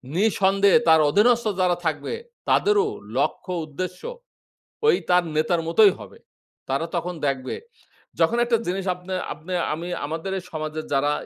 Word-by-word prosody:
নিঃসন্দেহে 195 +1 +4
তার 160 0 +7
অধীনস্থ 235 +7 +3 0.2
যারা 180 -1 +3
থাকবে 145 -3 -2 0.4
তাদেরও 415 +1 +3 0.3
লক্ষ্য 185 - -1
উদ্দেশ্য 180 +4 -6 0.9
ঐ - - +5 0.2
তার 180 0 +4
নেতার 160 +2 +1
মতোই 200 +4 +6
হবে। - - -12 0.5
তারা 135 +5 -1
তখন 180 +1 -3
দেখবে, 130 -2 -2 0.7
যখন 235 - +3
একটা 240 -1 +2
জিনিস 185 +2 -2
আপনে 180 +1 -7 0.2
আপনে 175 +4 -7 0.2
আমি 170 +3 -6 0.2
আমাদের 165 +5 -4
এই 180 - -9
সমাজের 155 0 -4
যারা 145 +1 +2
180 Hz, 140 wpm, -23 LUFS, 155-195 Hz, 0.9 s, তার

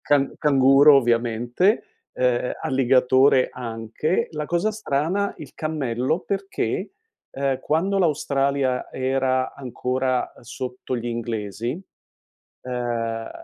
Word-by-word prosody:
can 140 -2 +2
canguro 140 0 +6
ovviamente, 120 - +1 0.3
ehm, 125 -1 0
alligatore 130 0 +4
anche, 115 +6 -2
la 150 -2 -4
cosa 175 +5 +1
strana 200 -1 -1
il 145 -4 -10
cammello 150 -1 -1
perché, 195 - -3 0.4
ehm, 135 -1 -1
quando 190 +6 0
l'Australia 140 -5 0
era 130 0 0
ancora 130 0 -2
sotto 125 0 -5
gli 120 0 -5
inglesi, 115 -1 -3 0.9
ehm, 120 -2 -3
130 Hz, 95 wpm, -23 LUFS, 120-150 Hz, 0.9 s, canguro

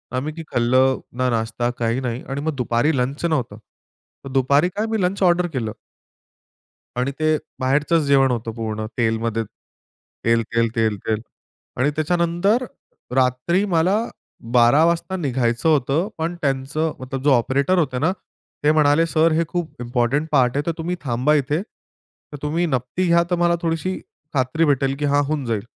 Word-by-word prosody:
आम्ही 145 +4 -2
की 165 0 -7
खाल्लं, 130 +2 +3 0.2
ना 130 0 +1
नाश्ता 115 +1 -1
काही 115 +2 0
नाही. 125 -1 -3
आणि 140 +1 -3
मग 155 -1 -2
दुपारी 125 +4 +1
लंच 135 +6 -1
नव्हतं. 125 -10 -1 0.7
मग 135 - -7
दुपारी 140 +6 +3
काय 215 +2 0
मी 220 -3 0
लंच 190 +2 0
ऑर्डर 175 0 +3
केलं. 110 -5 -2 1.2
आणि 130 +3 0
ते 155 0 +2 0.2
बाहेरचंच 150 +5 +2
जेवण 135 -2 +4
होतं 115 -1 -3
पूर्ण. 110 -1 -4
तेलमध्ये. 115 -1 0 0.8
तेल, 115 0 +3
तेल, 115 0 +3
तेल, 110 -2 +1
तेल. 110 -1 0 0.6
आणि 145 +3 +2
त्याच्यानंतर 175 +8 +1 0.5
रात्री 130 +9 +2
मला 180 +5 +3 0.6
12:00 125 +6 +5
वाजता 170 +3 0
निघायचं 130 -3 0
होतं. 150 +5 +2
पण 165 +2 -2
त्यांचं 140 +3 -1
मतलब 130 +1 -5
जो 145 - +4
ऑपरेटर 140 +8 +2
होते 130 -6 0
ना, 160 +5 +2 0.5
ते 150 - +5
म्हणाले, 155 +1 +4
"सर 165 0 +2
हे 165 +2 +2
खूप 170 -8 -5
इम्पोर्टंट 120 +5 0
पार्ट 125 0 +3
आहे. 145 - 0
तर - - +2
तुम्ही 175 +2 -2
थांबा 130 +2 +1
इथे. 145 +4 0
तर 150 -7 -17
तुम्ही 160 +4 0
नपती 130 +5 -1
घ्या 170 0 +4
तर - - +4
मला 170 0 +3
थोडीशी 165 +3 -2 0.3
खात्री 135 +5 +1
भेटेल 135 -1 +1
की 145 - 0
हां 145 0 +3
होऊन 145 -2 -2
जाईल." 110 -3 -2
140 Hz, 165 wpm, -21 LUFS, 125-165 Hz, 1.2 s, 12:00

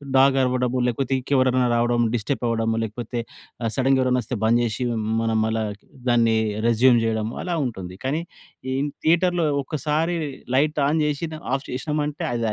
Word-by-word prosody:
Dog 135 0 +5
అరవడము, 125 0 0
లేకపోతే 135 +2 -1
ఇంకెవరన్నా 130 -1 +2
రావడం, 120 0 +2 0.2
డిస్టపవ్వడం, 115 -1 -1
లేకపోతే 120 +2 -5 0.4
ఆ - - +1
సడెన్‌గా 135 0 +3
ఎవరైనా 125 -1 +2
వస్తే 120 +1 -4
బంద్ 120 +2 +4
జేషి 120 +2 -2
హ్మ్, 110 -1 -2 0.2
మనం 115 -1 +1
మళ్ళా 110 0 0 0.5
దాన్ని 115 -2 +3 0.3
రెస్యూమ్ 120 +1 +5
జేయడం, 110 -1 0
అలా 175 -2 -2
ఉంటుంది. 95 -6 -6
కానీ 155 +5 0 0.5
ఈన్ 145 +1 0
థియేటర్‌లో 170 +1 +3 0.2
ఒక్కసారి 155 +4 -1 0.4
లైట్ 150 +2 +2
ఆన్ 155 +1 +1
జేషిన 150 +2 -2 0.2
ఆఫ్ 135 - -6
చేషినమంటే 150 +3 -2
అది 120 - -1
125 Hz, 150 wpm, -23 LUFS, 115-145 Hz, 0.5 s, Dog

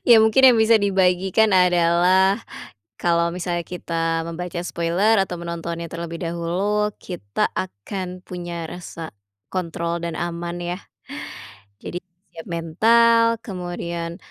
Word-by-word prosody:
Ya, 240 - +9
mungkin 220 +4 +4
yang 235 - +2
bisa 220 +1 +6
dibagikan 190 +1 +3
adalah, 180 +2 +4 0.6
kalau 170 0 +2
misalnya 175 -1 -2
kita 165 -2 -2
membaca 175 +1 -5
spoiler 175 +6 +2
atau 175 -2 -6
menontonnya 170 0 -5
terlebih 170 0 -6
dahulu, 180 +5 -1
kita 100 - -2
akan 185 - -5
punya 175 -2 -5
rasa 165 -4 -8 0.3
kontrol 170 -1 -3
dan 170 -1 -3
aman 170 0 -4
ya. 175 +1 -3 1.0
Jadi 175 - -5 0.3
siap 165 -1 -10
mental, 230 +8 +4
kemudian 170 -3 -5
175 Hz, 115 wpm, -22 LUFS, 170-190 Hz, 1.0 s, Ya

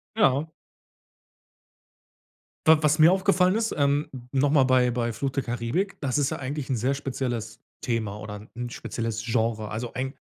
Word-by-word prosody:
Ja. 150 -5 +2 2.1
W 160 0 +8
was 150 +1 +3
mir 160 +3 +8
aufgefallen 190 0 +3
ist, 225 0 0
ähm, 145 +1 +2 0.2
nochmal 140 0 +3
bei 130 -1 +4
bei 120 -1 -1
„Fluch 135 +5 -2
der 135 0 -1
Karibik“: 120 - -2
Das 140 -2 -1
ist 140 -2 +2
ja - - -4
eigentlich 140 +1 -4
'n 130 - +1
sehr 125 +5 +1
spezielles 125 -5 -4 0.2
Thema 110 -4 -2
oder 105 0 -8
‘n 120 0 -4
spezielles 115 -1 -4
Genre. 110 -2 0
Also, 115 +2 -5
ein 130 +1 -3
130 Hz, 160 wpm, -26 LUFS, 115-145 Hz, 2.1 s, W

